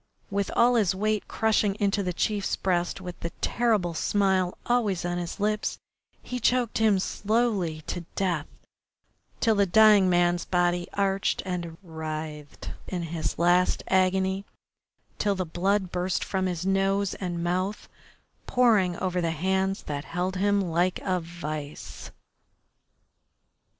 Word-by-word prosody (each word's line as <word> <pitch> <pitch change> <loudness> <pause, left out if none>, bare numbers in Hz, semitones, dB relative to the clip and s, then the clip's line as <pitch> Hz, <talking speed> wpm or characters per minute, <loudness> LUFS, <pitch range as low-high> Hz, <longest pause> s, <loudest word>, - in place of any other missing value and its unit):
With 200 0 0
all 240 +1 +5
his 205 -6 +2
weight 215 +1 0
crushing 215 -2 +1
into 200 0 +1
the 180 -2 -1
chief's 200 +3 -1
breast, 175 0 -1
with 180 -1 -7
the 170 - -3
terrible 215 -8 +1
smile 190 +1 +1
always 215 -8 +1
on 175 0 -1
his 175 +3 -5
lips, 210 +1 0 0.5
he 250 - -4
choked 245 -1 +1
him 215 -3 +4
slowly 200 -5 0
to 175 +3 -5
death, 175 -6 0 0.9
till 225 - +3
the 200 -1 +2
dying 210 0 +6
man's 175 -1 +2
body 175 -1 +1
arched 195 -1 0
and 175 -3 -4
writhed 155 -3 -6 0.2
in 180 -2 -3
his 155 -4 -2
last 175 +2 +3
agony, 190 +1 +2 0.8
till 205 -1 +1
the 185 -1 -2
blood 185 +3 0
burst 180 +1 -1
from 190 -1 -1
his 180 -1 -3
nose 195 0 +1
and 175 -3 -4
mouth, 185 +4 -1 0.6
pouring 215 -8 +3
over 180 -1 -1
the 165 - 0
hands 190 +4 0
that 145 0 -4
held 180 +2 -2
him 200 +2 +2
like 175 0 0
a 185 -1 0
vice. 155 -3 -7
185 Hz, 135 wpm, -27 LUFS, 175-200 Hz, 0.9 s, dying